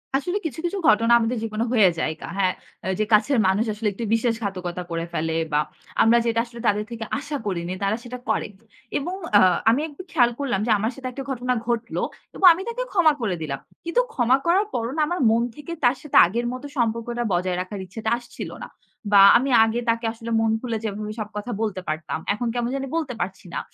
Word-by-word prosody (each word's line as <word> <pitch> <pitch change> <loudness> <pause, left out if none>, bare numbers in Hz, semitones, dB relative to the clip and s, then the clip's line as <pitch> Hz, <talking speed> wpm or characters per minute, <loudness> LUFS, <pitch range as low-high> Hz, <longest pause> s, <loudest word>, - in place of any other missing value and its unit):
আসলে 355 +8 0
কিছু, 315 -2 -4
কিছু, 350 +3 -1
ঘটনা 230 +2 +4
আমাদের 235 +2 -1
জীবনে 220 0 -2
হয়ে 210 -6 +6
যায় 160 - 0
কা - - -6
হ্যাঁ 185 -2 +2 0.5
যে 215 - +2
কাছের 220 +6 +4
মানুষ 195 +4 +2
আসলে 210 +1 -3
একটু 230 - -6
বিশ্বাস 230 0 +2
ঘাতকতা 180 -3 -4
করে 165 0 -2
ফেলে 160 0 -1 0.2
বা 150 - +3 0.4
আমরা 230 +1 +5
যেটা 230 -1 +1
আসলে 235 0 -12
তাদের 210 +1 +1
থেকে 230 -1 -5 0.2
আশা 295 0 -4
করিনি 180 -3 -2
তারা 200 +2 +1
সেটা 250 +1 -7
করে। - - 0 0.5
এবং 350 +6 -3 0.2
আ - - +7 0.3
আমি 240 +6 +3
একটু 295 +4 -10
খেয়াল 245 -6 +4
করলাম 265 -8 0
যে - - +2
আমার 220 +3 0
সাথে 265 -1 -6
একটা 270 +2 -6
ঘটনা 250 0 -1
ঘটল। 235 -1 -2 0.4
এবং 390 - +2
আমি 345 - -6
তাকে - - -3
ক্ষমা 340 -6 +5
করে 205 -6 0
দিলাম। 140 -3 -3 0.3
কিন্তু 340 +9 +2
ক্ষমা 250 +1 +3
করার 370 +5 +3
পরও 235 0 -2
না - - +2
আমার 350 +3 -2
মন 230 +1 +3
থেকে 295 +3 -9
তার 245 +1 +4
সাথে 300 - 0
আগের 235 +7 -2
মতো 255 +3 -7
সম্পর্কটা 235 0 -1
বজায় 180 0 0
রাখার 195 +2 -6
ইচ্ছাটা 220 +4 -4
আসছিল 240 -1 -8 0.2
না। - - -13 0.4
বা 200 -1 +8 0.2
আমি 265 +3 -1
আগে 225 +1 0
তাকে 230 +1 +1
আসলে 230 0 -7
মন 225 0 +2
খুলে 235 -3 -2
যেভাবে 210 0 -4
সব 210 -1 -4
কথা 210 +4 -4
বলতে 210 -4 -2
পারতাম। 155 0 -3
এখন 235 +4 -3
কেমন 240 -1 -1
জানি 270 0 -3
বলতে 315 -6 -1
পারছি 190 +2 -4
না। - - -1
230 Hz, 210 wpm, -23 LUFS, 205-255 Hz, 0.5 s, বা